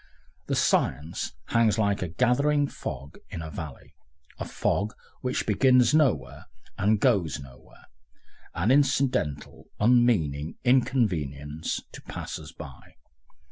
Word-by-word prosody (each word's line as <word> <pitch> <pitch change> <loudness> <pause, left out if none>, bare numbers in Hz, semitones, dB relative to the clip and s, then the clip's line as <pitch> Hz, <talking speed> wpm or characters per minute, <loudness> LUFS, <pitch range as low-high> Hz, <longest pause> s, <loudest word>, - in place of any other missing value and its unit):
The - - 0
science 75 +6 0 0.2
hangs 115 -2 +3
like 100 -2 +1
a 90 - -1
gathering 140 - +2
fog 70 - -7
in 80 - -6
a 80 - -7
valley, 75 -3 -8 0.5
a - - -3
fog 105 +4 -1 0.3
which 125 0 -1
begins 125 +3 +4
nowhere 155 -4 +1 0.3
and 105 +1 +2
goes 100 - +2
nowhere, 65 -3 -15 0.7
an 95 +8 +1
incidental, 130 - +1
unmeaning 105 - +2
inconvenience 80 - 0
to - - -10
passers 75 0 -7
by. 75 -6 -12
105 Hz, 110 wpm, -27 LUFS, 75-125 Hz, 0.7 s, begins